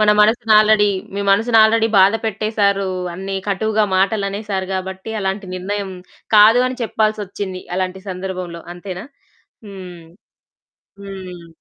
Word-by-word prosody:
మన 210 0 +5
మనసుని 220 +1 +3
ఆల్రెడీ 215 -1 +4 0.3
మీ 200 - -2
మనసుని 225 +3 +3
ఆల్రెడీ 225 +1 +4
బాధపెట్టేేశారు 205 0 +2 0.3
అన్ని 195 +2 -5
కటువుగా 215 +2 +1
మాటలునేసారు 200 0 -1
గాబట్టి 190 +2 -5
అలాంటి 195 0 -3
నిర్ణయం 195 +2 -4 0.4
కాదు 215 +3 +7
అని 255 0 -7
చెప్పాల్సొచ్చింది 205 -4 -2 0.2
అలాంటి 185 0 -3
సందర్భంలో 185 -2 -5
అంతేనా? 180 +2 -7 0.6
హ్మ్. 185 -4 -10 1.0
హ్మ్. 185 -3 -9
200 Hz, 110 wpm, -19 LUFS, 190-215 Hz, 1.0 s, కాదు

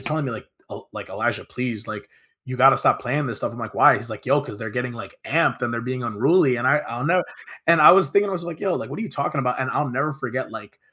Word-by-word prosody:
telling 155 -1 -2
me - - -3
like, 115 - -8 0.2
uh, - - -8
like, - - -8
"Elijah, - - -2
please, 120 -4 -5
like, 105 -2 -7 0.4
you 130 0 -6
gotta 135 +1 +6
stop - - +2
playing 140 +3 -1
this 115 - -4
stuff." - - -3
I'm 120 - -10
like, 115 -2 -7
"Why?" - - +6
He's 115 +3 -7
like, 110 +3 -9
"Yo, 140 +2 +3
'cause 125 -7 -9
they're 110 - -5
getting 125 +1 -3
like 120 0 -10
amped 160 -4 +1
and 120 - -1
they're 115 - -2
being 125 +1 -4
unruly," 125 - +2
and 125 +2 -2
I 150 +3 +4
I'll 120 +5 -4
know, 180 0 +2 0.4
and 165 -1 +5
I - - +10
was 195 +1 +4
thinking 200 0 +3
I - - -3
was 170 -2 -4
like, 170 -2 -7
"Yo, 190 -2 0
like - - -5
what - - -6
are - - -3
you 215 - -5
talking 140 0 -3
about?" 125 -1 -1
And 130 - -1
I'll 150 -2 -1
never 135 +5 -1
forget 135 - -5
like, - - -10
130 Hz, 285 wpm, -22 LUFS, 120-155 Hz, 0.4 s, I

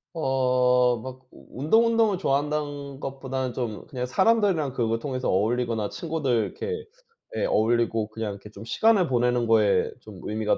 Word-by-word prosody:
어. 125 -4 +2
막 130 0 -9
운동 220 - +1
운동을 225 -4 +2
좋아한다는 145 -2 -2
것보다는 135 -2 -4
좀 115 -5 -4
그냥 125 -4 -4
사람들이랑 190 - +2
그걸 115 -2 0
통해서 130 -1 -3
어울리거나 110 +1 0
친구들 160 -6 -3
이렇게 455 0 -5 0.5
예. - - 0
어울리고 115 -1 +1
그냥 110 -1 -4
이렇게 100 +2 -12
좀 100 +1 -11
시간을 200 - +3
보내는 120 -1 +1
거에 105 -4 +3
좀 100 -5 -12
의미가 105 0 0
125 Hz, 360 characters per minute, -25 LUFS, 115-150 Hz, 0.5 s, 시간을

